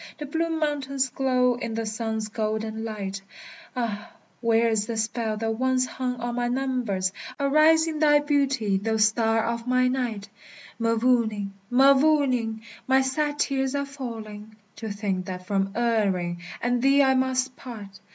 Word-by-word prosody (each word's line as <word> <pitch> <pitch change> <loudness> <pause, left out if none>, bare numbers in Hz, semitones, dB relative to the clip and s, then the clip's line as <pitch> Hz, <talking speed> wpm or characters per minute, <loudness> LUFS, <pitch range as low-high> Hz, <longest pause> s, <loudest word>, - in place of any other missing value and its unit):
The 300 - -5
blue 325 +4 -1
mountains 280 -4 -1
glow 255 -1 +2
in 230 -2 -4
the 225 0 -2
sun's 220 0 -3
golden 220 0 -3
light; 200 -3 -5 0.5
Ah, 220 -4 -3 0.3
where 230 -1 +3
is 215 -2 0
the 230 - -3
spell 220 0 -1
that 225 +1 -2
once 260 -1 +2
hung 255 0 -3
on 240 0 -4
my 245 0 -1
numbers? 245 -7 -1 0.3
Arise 305 +3 +5
in 315 -2 -3
thy 295 -1 +5
beauty, 275 -8 +1
thou 220 +3 -1
star 225 +1 +3
of 235 +1 -3
my 255 0 +3
night! 240 -6 -2 0.5
Mavourneen, 230 -3 +1 0.2
Mavourneen, 265 -4 +3 0.3
my 265 0 +4
sad 290 +3 -1
tears 270 -1 0
are 280 0 -1
falling, 220 -6 -8 0.2
To 225 - -5
think 200 -3 -3
that 180 -1 -6
from 195 0 0
Erin 200 -7 0 0.2
and 245 0 +1
thee 275 +2 +5
I 265 -1 +4
must 260 0 0
part! 210 -7 -10
240 Hz, 150 wpm, -25 LUFS, 220-265 Hz, 0.5 s, Arise